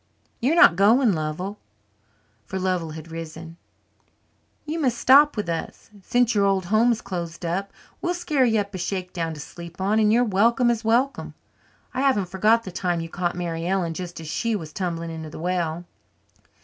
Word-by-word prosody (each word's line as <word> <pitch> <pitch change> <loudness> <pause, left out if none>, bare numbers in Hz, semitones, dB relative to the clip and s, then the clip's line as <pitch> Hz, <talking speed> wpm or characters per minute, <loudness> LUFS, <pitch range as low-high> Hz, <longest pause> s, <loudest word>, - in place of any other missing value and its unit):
You're 270 +7 +2
not 170 - +7
going, 220 +4 +4
Lovell" 165 +6 -4 0.9
for 190 - -4
Lovell 185 -3 -1
had 160 +1 -10
risen 165 0 -8 1.1
"you 310 +2 -3
must 255 -6 +1
stop 285 +2 +6
with 210 - -2
us, 165 +5 -5
since 245 +3 +2
your 205 -2 +2
old 195 -2 +1
home 220 +6 +3
is 225 - -1
closed 170 -2 -5
up. 190 +4 -2 0.3
We'll 355 0 -1
scare 305 -6 +1
you 225 -3 +3
up 200 0 -8
a 185 - -5
shakedown 180 -3 -3
to - - -10
sleep 170 +4 -10
on 200 +3 +2
and 210 -1 +4
you're 240 +2 +4
welcome 235 +3 +3
as 230 -1 -2
welcome. 245 +5 0 0.6
I 255 - -1
haven't 210 -10 +2
forgot 215 +5 +3
the 190 - -7
time 175 -1 -1
you 165 - -6
caught 175 0 -2
Mary 170 -1 -3
Ellen 180 -3 0
just 175 +1 -7
as 160 - -8
she 230 +8 -1
was 160 -6 -6
tumbling 170 -3 -3
into 160 -1 -7
the - - -10
well." 175 -1 -2
190 Hz, 185 wpm, -24 LUFS, 170-230 Hz, 1.1 s, not